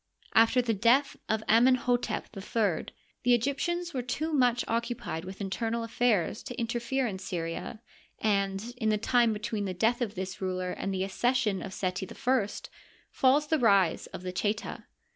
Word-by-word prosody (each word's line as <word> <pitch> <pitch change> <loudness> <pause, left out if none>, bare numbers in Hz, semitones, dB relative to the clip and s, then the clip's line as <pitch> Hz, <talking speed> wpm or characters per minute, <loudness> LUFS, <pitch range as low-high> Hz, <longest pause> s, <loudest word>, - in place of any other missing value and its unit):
After 230 +2 +5
the 230 -1 +1
death 240 +7 +3
of 220 0 0
Amenh6tep 245 +1 +3
III, 195 -3 -1 0.3
the 245 0 +4
Egyp 275 +4 -1
tians 345 0 -2
were 260 - -1
too 310 +6 -3
much 245 -4 +3
occupied 230 -8 -2
with 190 +1 -8
internal 225 +4 -2
affairs 225 -4 +1
to 245 +1 -7
inter 235 +1 -1
fere 265 +3 -1
in 195 -5 -3
Syria, 185 +3 -5 0.3
and 200 +2 0
in 220 -3 0
the 215 - +2
time 235 +1 +3
between 215 -1 -3
the 185 -1 -3
death 225 +6 +1
of 220 -4 -2
this 185 0 -5
ruler 185 -1 -2
and 195 - -3
the 190 -1 -1
accession 215 0 0
of 190 - -6
Seti 185 0 -3
I 250 -5 +1 0.6
falls 270 +3 +3
the 315 +1 +1
rise 200 -8 +3
of - - -9
the 180 - -3
Cheta. 210 +3 -2
225 Hz, 170 wpm, -29 LUFS, 195-245 Hz, 0.6 s, After